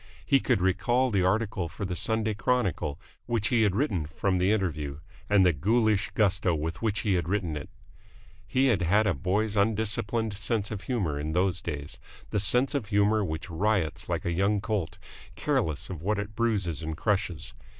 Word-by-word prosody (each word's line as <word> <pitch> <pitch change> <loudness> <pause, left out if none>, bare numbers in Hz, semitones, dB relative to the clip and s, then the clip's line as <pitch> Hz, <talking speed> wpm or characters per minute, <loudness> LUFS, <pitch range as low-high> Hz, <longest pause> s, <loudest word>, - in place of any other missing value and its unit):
He 135 - +4
could 95 - +1
recall 120 +8 +2
the 100 -3 +2
article 100 -2 0
for 100 - -5
the 90 -1 -3
Sunday 110 +2 0
Chronicle 100 - -1 0.3
which 115 -2 0
he 120 -3 +3
had 100 -3 +2
written 100 - 0
from 90 +4 -1
the 95 +3 +3
interview, 75 -9 -1 0.3
and 100 -2 +5
the 90 - +4
ghoulish 105 - +2
gusto 95 -4 +2
with 80 +2 -4
which 110 -3 0
he 100 - +1
had 85 -2 0
written 90 -6 -1
it. 75 - -6 0.8
He 130 +1 +2
had 110 -5 +2
had 100 +6 +3
a - - +2
boy's 100 +3 -1
undisciplined 110 +1 +1
sense 105 +1 -2
of 105 -3 -4
humour 90 - -2
in 75 +2 -3
those 90 0 +1
days, 70 0 -5 0.3
the 105 - +1
sense 125 +7 +2
of 135 -8 -2
humour 105 +1 +3
which 80 -2 -4
riots 95 -2 0
like - - -2
a 85 - 0
young 100 +4 +1
colt, 105 -5 -2 0.4
careless 80 -1 -1
of 90 -5 -7
what 105 +4 0
it 105 +1 -5
bruises 100 -9 0
and 80 -1 -4
crushes. 95 -6 -1
100 Hz, 185 wpm, -28 LUFS, 85-110 Hz, 0.8 s, and